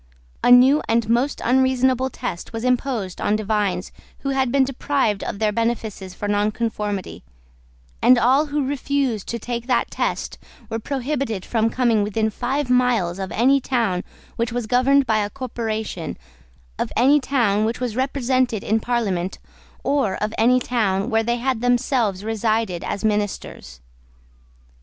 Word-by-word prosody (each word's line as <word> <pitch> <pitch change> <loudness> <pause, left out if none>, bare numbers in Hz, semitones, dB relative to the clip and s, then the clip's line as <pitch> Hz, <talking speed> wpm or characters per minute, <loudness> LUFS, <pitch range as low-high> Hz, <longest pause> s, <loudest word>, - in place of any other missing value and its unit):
A - - +4
new 255 +4 +7
and 230 -1 +2
most 245 +5 0
unreasonable 260 0 +2
test 235 -8 -6
was 225 0 -4
imposed 250 -7 -1
on 210 - +1
divines 205 -4 -1 0.3
who 275 - -2
had 265 -2 +1
been 275 0 +4
deprived 265 -5 0
of - - -4
their 215 0 +1
benefices 220 -4 -3
for 205 - -4
nonconformity; 210 -1 -2 0.8
and 250 +2 +6
all 265 +6 +3
who 290 -1 -1
refused 275 -5 -1
to 235 - -3
take 235 +1 -5
that 250 -3 +1
test - - -2 0.3
were 225 - -1
prohibited 265 -5 -3
from 225 -1 +1
coming 235 -3 +2
within 215 +2 0
five 260 +6 -2
miles 245 -8 +2
of 190 -1 -4
any 270 +4 +3
town 225 -9 0 0.3
which 230 0 -1
was 240 -1 -2
governed 260 +4 +3
by 220 -2 +2
a 205 -1 -1
corporation, 220 -7 -4 0.6
of - - -2
any 280 +4 +5
town 230 -7 +1
which 225 +2 -1
was 245 -3 -3
represented 255 -3 0
in 220 +2 +1
Parliament, 200 -7 -1 0.5
or 275 -9 +1
of 215 +2 -3
any 250 +3 +4
town 220 -3 0
where 225 0 +3
they 235 +2 0
had 250 -1 -1
themselves 245 -5 +1
resided 220 -4 -1
as 205 +2 -3
ministers. 205 - -3
235 Hz, 150 wpm, -22 LUFS, 210-255 Hz, 0.8 s, new